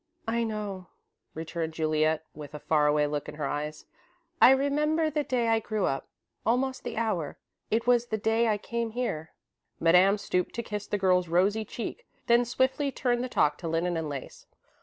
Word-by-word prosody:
"I 230 +1 +1
know," 205 -4 -4 0.5
returned 160 0 -4
Juliet, 155 0 +1
with 150 0 -9
a - - -6
far 150 0 +2
away 150 0 +3
look 145 0 -3
in - - -8
her 150 -1 -3
eyes. 150 +2 -4 0.6
"I - - +10
remember 300 +4 +2
the 300 0 0
day 250 -4 0
I 225 0 +3
grew 215 -2 -1
up 135 - -2 0.4
almost 260 +3 0
the - - -5
hour. 200 -10 -1 0.3
It 230 +2 +1
was 240 -1 +3
the 220 - -1
day 225 +2 +2
I 215 -2 +2
came 230 +1 -3
here." 160 -11 -3 0.5
Madame 180 +5 +5
stooped 180 -3 -1
to 235 - -2
kiss 210 -2 -5
the 205 - -1
girl's 180 -2 +2
rosy 195 +6 +2
cheek, 240 - -6 0.2
then 235 +1 +4
swiftly 260 +3 +1
turned 245 -2 0
the 255 - -3
talk 150 -9 +2
to 170 - -5
linen 165 +2 0
and 160 -2 -2
lace. 140 -3 -8
210 Hz, 185 wpm, -28 LUFS, 160-240 Hz, 0.6 s, I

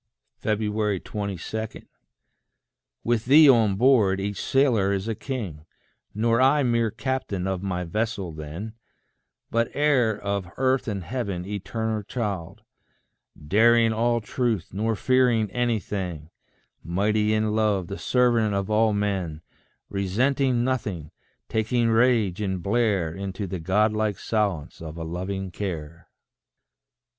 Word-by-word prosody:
22. 105 -2 -2 1.6
With 115 -1 0
thee 150 +4 +8
on 115 -7 +5
board, 110 -5 +4
each 100 0 -3
sailor 120 -8 +2
is 100 +2 -2
a 115 - 0
king 105 - -5 0.5
Nor 115 +3 +2
I 140 +2 +4
mere 115 -2 +2
captain 115 -5 -3
of 95 -2 -2
my 90 -2 -2
vessel 100 0 -2
then, 80 +8 -7 0.8
But 115 0 +1
heir 130 -8 +2
of 100 -2 -2
earth 130 0 +1
and 100 -4 -3
heaven, 100 -6 -3
eternal 110 +2 -3
child; 100 -6 -4 0.8
Daring 115 +4 +4
all 120 +1 +1
truth, 110 -5 -2
nor 110 +3 0
fearing 120 -3 +2
anything; 95 -9 -2 0.5
Mighty 105 +4 +1
in 110 0 0
love, 105 -4 +1
the 100 +3 -7
servant 120 -4 +2
of 100 +1 -2
all 110 0 +3
men; 95 -6 -2 0.4
Resenting 120 +6 +1
nothing, 105 - -2 0.4
taking 115 +2 +1
rage 115 -5 +2
and 95 -3 -2
blare 100 -7 +1
Into 100 +2 -5
the 95 -1 -4
Godlike 105 +3 +1
silence 100 -11 -2
of 80 0 -7
a 80 - -4
loving 95 +3 -4
care. 85 -4 -6
105 Hz, 120 wpm, -25 LUFS, 95-115 Hz, 1.6 s, thee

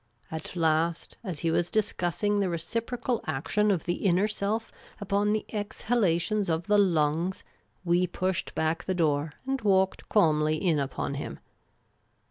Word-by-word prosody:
At 160 +2 -5
last, 165 0 +1
as 180 -8 -4
he 165 - +1
was 170 +1 +1
discussing 205 -1 0
the 195 -2 +1
reciprocal 230 +8 -2
action 210 +10 +1
of 190 -5 +1
the 175 - -2
inner 185 +3 +3
self 215 +1 -2 0.3
upon 205 +1 +1
the 215 0 0
exhalations 205 -2 0
of 160 +1 0
the 210 0 +4
lungs, 170 -1 +1 0.4
we 175 +1 +3
pushed 185 +1 -2
back 160 +2 0
the 185 - -1
door 150 -3 +1
and 270 -1 -1
walked 190 -2 +2
calmly 155 -6 +3
in 155 -1 +1
upon 140 0 -2
him. - - -7
180 Hz, 145 wpm, -28 LUFS, 160-210 Hz, 0.4 s, the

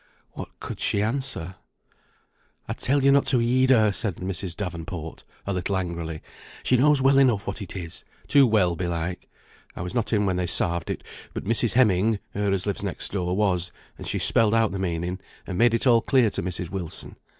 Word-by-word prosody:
What - - -10
could - - -7
she 100 - +1
answer? 110 -7 -3 1.1
"I - - -2
telled 140 +1 0
ye 140 - +5
not 140 0 +3
to 130 - +3
heed 125 +2 +2
her," 110 -5 +5
said 95 0 -1
Mrs. 90 -1 -4
Davenport, 85 -3 -6 0.2
a 100 - -2
little 95 +2 -1
angrily. 85 -3 -5 0.4
"She 130 - +3
knows 140 +2 +4
well 135 0 +5
enough 115 -6 +3
what - - -5
it 100 - -7
is, 85 -3 -7 0.2
too 140 -2 +5
well, 95 -6 +2
belike. 85 0 -4 0.5
I - - -6
was 90 0 -5
not 120 -3 -1
in 105 -2 +2
when 95 -2 0
they 90 -1 -1
sarved 85 -1 +4
it; - - -4 0.3
but - - -5
Mrs. 115 +2 +2
Heming 110 -3 +3 0.2
(her 100 0 -1
as 95 -1 -1
lives 100 -2 -2
next 100 - -5
door) 90 -2 -2
was, 90 -4 0 0.2
and - - -9
she - - 0
spelled 115 -1 +4
out 115 -2 +2
the 95 - -4
meaning, 90 0 -3 0.3
and 95 - -5
made 120 0 +4
it 115 - 0
all 120 -3 +5
clear 125 -5 +2
to - - -1
Mrs. 90 -1 -3
Wilson. 90 -5 -6
100 Hz, 200 wpm, -24 LUFS, 90-115 Hz, 1.1 s, ye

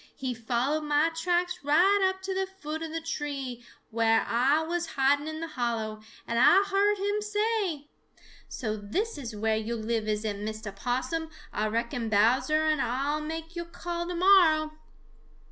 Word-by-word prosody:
He 260 -2 -3
followed 245 +6 -1
mah 295 +2 +3
tracks 355 +2 0
right 380 +7 +4
up 380 0 -7
to 380 0 -2
the 380 0 -1
foot 320 -5 -6
of 325 -1 -5
the 330 0 -3
tree 280 -6 -4 0.3
whar 225 0 +3
Ah 275 +7 +2
was 345 0 -1
hiding 285 +2 +2
in 315 0 -5
the 330 - -3
hollow, 230 -5 -2 0.3
and 235 0 0
Ah 390 +9 +7
heard 405 +1 +3
him 410 +2 -1
say: 420 -7 -1 0.6
"So 215 -4 -3
this 295 - -3
is 235 -5 -6
whar 220 +1 0
yo' 220 +2 -2
live, 220 -1 -2
is 215 0 -1
it, 205 -2 -2
Mistah 215 0 -5
Possum? 260 +9 -2 0.2
Ah 215 - 0
reckon 230 +1 -2
Bowser 245 +9 +3
and 310 -3 +2
Ah'll 275 +5 -1
make 325 +2 -6
yo' 345 - -2
a - - -7
call 345 0 -4
to 355 - -3
morrow." 340 -4 +5
295 Hz, 175 wpm, -28 LUFS, 235-345 Hz, 0.6 s, Ah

